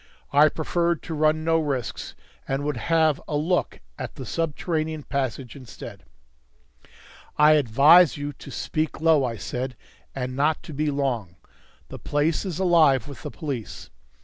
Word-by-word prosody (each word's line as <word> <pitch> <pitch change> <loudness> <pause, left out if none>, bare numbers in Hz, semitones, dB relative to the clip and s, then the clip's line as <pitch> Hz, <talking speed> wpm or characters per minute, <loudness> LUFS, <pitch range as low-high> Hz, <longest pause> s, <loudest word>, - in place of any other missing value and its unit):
I 150 +2 +6
preferred 170 +2 -1
to 165 - -6
run 155 +1 +2
no 165 0 +2
risks, 135 -8 -3 0.3
and 135 +1 -2
would 145 -1 -1
have 160 +2 +2
a 150 - -1
look 170 +4 -1 0.2
at - - -6
the 130 - -7
subterranean 155 - -2
passage 130 -3 -3
instead. 130 -4 -11 1.3
"I 150 +1 +6
advise 150 +5 +6
you 145 0 -4
to - - -12
speak 155 0 -3
low," 160 -3 +4
I 115 -3 -2
said, 125 +5 -5 0.4
"and 130 -1 -4
not 150 +3 +1
to 160 - -9
be 150 +2 -1
long. 125 -11 -2 0.5
The - - -8
place 150 +5 0
is 180 -5 -4
alive 160 - +4
with 140 -3 -10
the - - -6
police. 140 -9 -6
150 Hz, 150 wpm, -24 LUFS, 135-160 Hz, 1.3 s, I